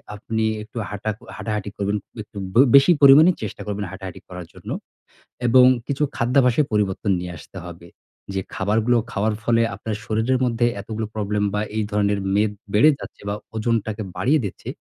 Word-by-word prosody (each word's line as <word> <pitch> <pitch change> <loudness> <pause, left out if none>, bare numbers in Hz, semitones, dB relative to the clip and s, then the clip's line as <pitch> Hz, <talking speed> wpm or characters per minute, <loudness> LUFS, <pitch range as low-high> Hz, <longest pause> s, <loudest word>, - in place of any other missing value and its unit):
আপনি 110 +1 -2 0.2
একটু 110 +2 -13
হাঁটা 105 +1 -4 0.3
হাঁটাহাঁটি 105 -2 -3
করবেন, 100 +1 0 0.3
একটু 105 - -15 0.2
বে 120 - +7
বেশি 140 +5 +7
পরিমাণে 145 +6 +8
চেষ্টা 105 - -6
করবেন 105 0 -3
হাঁটাহাঁটি 95 -2 -8
করার 90 -1 -8
জন্য। - - -11 0.8
এবং 125 +2 +7 0.2
কিছু 140 +1 -2
খাদ্যাভ্যাসে 125 +2 +3
পরিবর্তন 105 -1 0
নিয়ে 90 0 -6
আসতে 95 - -15
হবে। 85 0 -11 0.5
যে 95 - 0
খাবারগুলো 110 +5 +1 0.2
খাওয়ার 105 +1 0
ফলে 115 0 +2
আপনার 105 +1 -4
শরীরের 115 +4 +1
মধ্যে 120 -1 +1
এতগুলো 110 +2 -4
প্রবলেম 105 -1 -1
বা 105 - +1 0.2
এই 110 - +1
ধরনের 100 -1 +1 0.2
মেদ 105 0 +2 0.2
বেড়ে 115 +9 +6
যাচ্ছে - - -11
বা 100 - -1 0.2
ওজনটাকে 110 -1 -1
বাড়িয়ে 145 +3 +2
দিচ্ছে, 100 - -7
110 Hz, 160 wpm, -22 LUFS, 100-120 Hz, 0.8 s, পরিমাণে